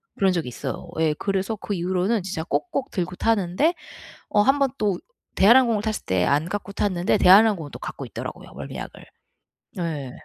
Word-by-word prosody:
그런 195 -1 +3
적이 170 -6 -2
있어요. 120 - -6
예 160 -1 +2
그래서 195 +2 -1
그 205 0 -5
이후로는 185 +4 0
진짜 180 -4 -4
꼭꼭 275 - -2
들고 180 -1 -3
타는데 225 - +1 0.6
어 210 - +4
한번 275 +4 +3
또 205 -4 0 0.4
대한항공을 230 0 +5
탔을 215 -1 -2
때 95 -1 +1
안 150 - +1
갖고 200 0 -4
탔는 185 -4 -1
데 - - +4
대한항공은 195 -4 +5
또 - - -8
갖고 - - -6
있더라고요 - - -8
멀미약을. - - -8 0.7
네. 155 -7 -4
195 Hz, 355 characters per minute, -24 LUFS, 175-215 Hz, 0.7 s, 대한항공을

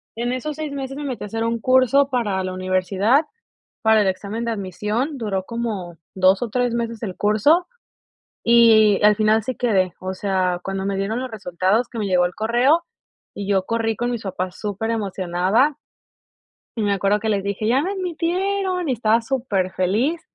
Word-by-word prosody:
en 240 +2 -2
esos 290 +3 -4
6 310 -2 -5
meses 270 0 -5
me 295 - -5
metí 260 -6 -4
a - - -5
hacer 225 +2 -3
un 230 0 -1
curso 260 +2 +4
para 210 -7 -1
la 185 - -3
universidad, 185 - +1 0.6
para 220 -1 +4
el - - 0
examen 200 +5 -3
de 235 - -1
admisión, 215 - -3
duró 200 -6 -2
como 210 -8 -4 0.2
2 190 +3 +3
o 230 - -2
3 245 0 0
meses 230 -1 -3
el 190 -4 -4
curso, 250 - +3 0.8
y 225 -3 +6
al 210 0 +6
final 215 0 +2
sí 255 - -3
quedé, 190 -7 +1
o 185 0 -5
sea, 185 -2 0
cuando 195 0 -3
me 195 -1 -1
dieron 215 +5 -2
los 260 0 -4
resultados, 195 +2 0
que 230 - -6
me 205 - -1
llegó 180 -1 +3
el 180 - -3
correo, 245 +9 +2 0.5
y 200 - -5
yo 195 -2 +1
corrí 225 -1 0
con 240 +3 -2
mis 235 -3 -4
papás 185 -1 -4
superemocionada 205 - 0 1.0
y 220 - -1
me 205 -1 +1
acuerdo 200 +2 +1
que 220 +1 -2
les 200 -2 0
dije: 200 +2 -3
"¡Ya 250 +5 +3
me 375 +6 -2
admitieron!" 365 -1 -1
y - - +2
estaba 225 0 +2
superfeliz 225 - -1
220 Hz, 185 wpm, -21 LUFS, 195-250 Hz, 1.0 s, y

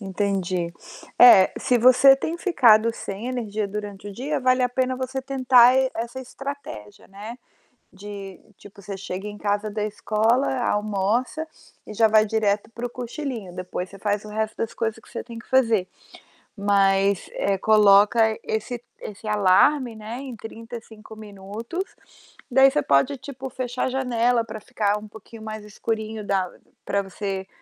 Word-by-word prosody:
Entendi. 190 -3 -2 0.5
É, 195 -6 +8
se 250 -2 +2
você 255 +3 +7
tem 320 +5 -4
ficado 230 - +4
sem 200 +2 -6
energia 220 -5 -3
durante 205 -1 -7
o 205 - -6
dia, 265 +9 -3
vale 255 0 +2
a 250 - +2
pena 255 +1 -1
você 260 +1 -4
tentar 255 -2 +5
e 265 0 +2
essa 235 +3 -5
estratégia, 260 - -9
né, 210 +4 -9 0.6
de 195 -1 -9 0.2
tipo, 200 0 -15
você 195 0 -6
chega 195 +1 -6
em 210 - -9
casa 205 +1 -1
da 210 0 -3
escola, 220 +5 +1
almoça 215 +9 -1 0.4
e 215 - -8
já 225 +1 +4
vai 215 0 +4
direto 210 -1 0
para 235 +2 -5
o - - -8
cochilinho, 245 - -6
depois 180 0 -5
você 195 0 -14
faz 205 0 -1
o - - -9
resto 220 +1 -3
das 225 - -3
coisas 225 0 -2
que 225 - -19
cê - - -6
tem 235 -1 -10
que 230 - -14
fazer. 230 -7 +2 0.7
Mas, 200 -1 +2
eh, 200 -1 0
coloca 210 +1 +5 0.2
esse 225 +2 -3 0.2
esse 210 +1 -9
alarme, 220 +6 +3
né, 220 +3 -7
em 265 -3 -7
35 225 -1 -10
minutos. 215 - -7 0.6
Daí, 265 +2 +7
você 295 +2 0
pode, 140 - +2
tipo, 265 0 -8
fechar 250 0 -4
a - - -1
janela 245 -2 +1
pra 220 -1 -8
ficar 210 0 -1
um 215 - -11
pouquinho 220 +1 -13
mais 215 -1 -7
escurinho 220 +1 -4
da 190 -3 0 0.3
pra 200 - 0
você, 195 0 -5
220 Hz, 160 wpm, -23 LUFS, 200-250 Hz, 0.7 s, É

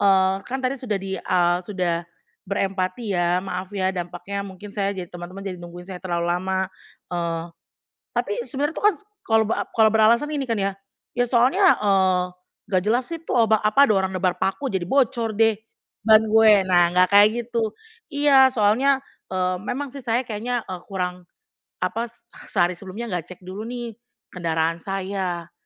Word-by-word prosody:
eee, 190 -1 +3
kan 260 +1 -3
tadi 260 0 -1
sudah 220 -5 -1
di, 195 0 -5
eee, 175 -1 +2
sudah 175 -3 -2 0.4
berempati 195 +2 -1
ya 175 0 +1
maaf 185 -1 -4
ya 190 0 +1
dampaknya 180 +2 -5
mungkin 200 +2 -10
saya, 200 -1 -1
jadi 180 -2 -5
teman-teman 180 +3 -8
jadi 180 -3 -5
nungguin 175 +1 -9
saya 185 -1 -8
terlalu 170 -2 -2
lama, 190 +1 -1 0.4
eee, 170 -1 -2 0.7
tapi - - 0
sebenarnya 290 +3 -2
itu - - -5
kan 395 - -7
s - - -21 0.2
kalau 225 0 +3
bera 220 - 0
kalau 220 -1 +6
beralasan 235 +7 +4
ini 280 -2 -1
kan 225 - +1
ya, 195 0 0 0.4
ya 245 - +2
soalnya, 270 +11 +4
eee, 190 -3 +3 0.5
nggak 185 -2 +2
jelas 245 +2 +1
sih 330 -1 -6
itu - - -5
ba 220 0 +2
apa 215 +7 +5
ada 215 - +3
orang 190 0 0
nebar 185 -1 +1
paku 195 +11 -1
jadi 190 -2 -1
bocor 235 -1 +1
deh 225 -1 +5 0.5
ban 220 0 +6
gue. 220 0 +6
Nah, 175 -2 +4
nggak 180 +1 +4
kayak 205 +1 +9 0.2
gitu, 230 -2 -1 0.4
iya 285 -3 +5
soalnya, 255 +4 +3 0.3
eee, 185 0 0
memang 270 +5 -4
sih 275 - -7
saya 240 +1 0
kayaknya, 235 +2 -3
eee, 185 -2 -6
kurang 180 -1 -3 0.6
apa 230 +1 -1 0.4
sehari 175 +1 +2
sebelumnya 195 +6 -7
nggak 175 -3 -2
cek 180 - -10
dulu 190 +3 -6
nih 240 -2 -5 0.4
kendaraan 165 -1 -1
saya, 190 -3 -3
195 Hz, 175 wpm, -23 LUFS, 180-230 Hz, 0.7 s, kayak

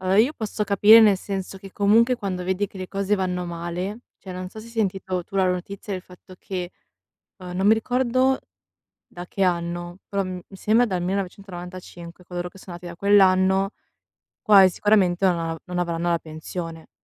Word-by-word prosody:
Allora, 190 +1 +2
io 245 +7 +4
posso 215 -1 -3
capire 210 +2 +7
nel 210 -3 +6
senso 195 0 -5
che, 195 0 -12
comunque, 225 +5 +4
quando 185 -5 -4
vedi 190 +2 0
che 195 - -15
le 185 - -5
cose 200 +2 0
vanno 180 -2 -2
male 175 +5 -4 0.2
cioè, 190 - -11
non 180 0 -6
so 220 - -11
se 225 - -12
hai - - -12
sentito 190 -4 -1
tu 195 - -8
la 190 -1 +3
notizia 190 +2 -4
del 185 - -6
fatto 180 0 -15
che, 180 -2 -5 0.7
uhm, 180 -2 -8
non 190 +2 +1
mi 215 - +7
ricordo 255 +3 +2 0.7
da 175 0 -9
che 195 - -1
anno, 175 0 -2
però 200 -1 0
m 185 -1 -5
mi 195 - -14
sembra 225 +5 +3
dal 190 -6 -2
1995 180 -2 -6
coloro 175 0 -5
che 195 - -17
sono 185 -1 -10
nati 175 - -11
da 170 -1 -8
quell'anno, 190 -1 +4 0.7
quasi 200 -4 +7
sicuramente 190 -1 +2
non 175 -2 +2
av 165 -1 -3
non 180 0 -5
avranno 170 -1 -1
la 170 - +2
pensione; 160 +1 -7
185 Hz, 190 wpm, -24 LUFS, 180-200 Hz, 0.7 s, capire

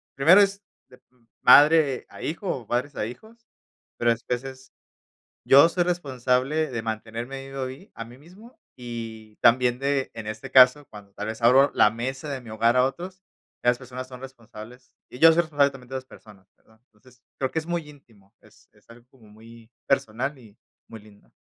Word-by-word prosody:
primero 165 +9 +6
es 200 0 0 0.3
de 125 - -18
uh, 125 -2 -33 0.2
madre 145 0 +5
a - - -13
hijo 170 +5 -5
o 120 -9 -4
padres 125 +5 -2
a 105 - -3
hijos, 220 - -12 0.5
pero 120 - +2
después 120 +1 -4
es 130 0 -11 0.7
yo 140 +4 +7
soy 175 +1 -1
responsable 140 -2 -1
de 115 -3 -4
mantenerme 115 +4 -6
vivo 135 0 -7
a - - -2
mí 130 +10 -11
a 115 - -7
mí 120 +1 -14
mismo 190 - -17 0.2
y 115 -3 -9
también 125 +1 +3
de, 140 0 -1
en 115 -2 -8
este 110 0 -7
caso, 130 +3 +6
cuando 100 -2 -14
tal 105 +1 -7
vez 110 +1 -7
abro 135 +4 +5
la 105 - +4
mesa 130 +5 -5
de 135 -2 -4
mi 120 - -15
hogar 115 +3 +1
a 125 - +4
otros, 180 +8 -5 0.4
ya - - 0
las 120 - -3
personas 130 0 -9
son 125 -1 -11
responsables, 125 -1 -13 0.2
y 125 - -11
yo 165 +3 +7
soy 170 +1 +2
responsable 145 -3 +1
también 125 -2 -14
de - - -7
las 130 - -6
personas, 100 -6 -17
perdón, 110 0 -28
entonces, 125 +3 -24 0.2
creo 130 -1 -2
que - - -3
es 155 - -13
muy 170 -3 -4
íntimo, 115 -9 -20
es - - -23
es - - -29
algo 120 +1 -17
como 120 -5 -21
muy 115 +2 -17 0.2
personal 135 +2 -1
y 110 -4 -19 0.3
muy 110 -1 -11
lindo. 105 -1 -21
125 Hz, 200 wpm, -24 LUFS, 115-140 Hz, 0.7 s, yo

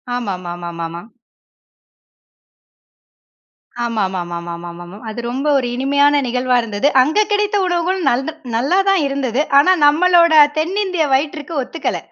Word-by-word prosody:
ஆமாமாமாமாமா. 175 -6 -5 2.8
ஆமாமாமாமாமாமாமா. 175 -4 -5
அது 220 - -7
ரொம்ப 270 +4 -3
ஒரு 255 -2 -1
இனிமையான 285 +2 +2
நிகழ்வா 250 +1 0
இருந்தது. 220 +3 -1
அங்க 305 +10 +1
கிடைத்த 415 0 +1
உணவுகள் 360 +1 -1
நல்ல 265 +5 -1 0.3
நல்லா 280 +11 +1
தான் 390 -3 +3
இருந்தது. 275 -2 -1 0.2
ஆனா, 290 +6 +5 0.2
நம்பளோட 340 +2 +4 0.2
தென்னிந்திய 365 +1 -1
வயிற்றுக்கு 295 +3 -2
ஒத்துக்கல. 325 +6 -4
265 Hz, 100 wpm, -17 LUFS, 195-330 Hz, 2.8 s, ஆனா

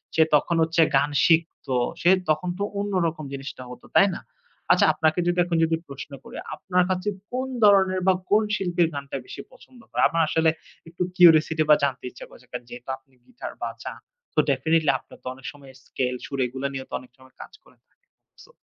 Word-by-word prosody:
সে 160 - +6
তখন 160 +3 +2
হচ্ছে 165 +1 +2 0.2
গান 145 +2 +2 0.2
শিখত, 165 -3 +1 0.3
সে 175 - +4 0.2
তখন 175 +4 +1
তো - - 0 0.2
অন্য 205 0 -3
রকম 155 -2 -5
জিনিসটা 135 -1 -7
হত, 125 0 -11
তাই 200 - +7
না? - - -7 0.5
আচ্ছা, - - +5
আপনাকে 160 +2 +1
যদি 175 0 +1
এখন 170 -2 -1
যদি 165 0 +1
প্রশ্ন 140 +1 -9
করি, - - -10 0.2
আপনার 180 -2 +1
কাছে 185 +2 -1 0.2
কোন 255 +1 -2 0.2
ধরনের 190 -2 +5
বা 190 - +6 0.2
কোন 215 +1 +4
শিল্পীর 175 -3 +1
গানটা 140 -1 -5
বেশি - - -8
পছন্দ 255 -1 -18
করে? - - 0
আমার 165 - +1
আসলে 160 0 +3 0.4
একটু 170 +2 -10 0.2
curiosity 160 -2 +6
বা 150 - +9
জানতে 135 -2 -1
ইচ্ছা - - -11
করছে। 125 - -18
কা 125 - -3
যেহেতু 120 +1 -10
আপনি 135 0 -34
guitar 250 - -8
বাজান - - -7 0.4
so 155 - +3
definitely 155 +3 +2
আপনার - - -17
তো - - -8
অনেক 130 0 -16
সময় 140 -2 -15
scale 125 -1 -2
সুর 140 - -5
এগুলা 130 +3 -3
নিয়ে 135 -1 -5
তো - - -14
অনেক 125 -1 -17
সময় 130 0 -20
কাজ - - -11
করে - - -23
থাকে। - - -42 0.5
So - - -19
160 Hz, 200 wpm, -24 LUFS, 135-180 Hz, 0.5 s, বা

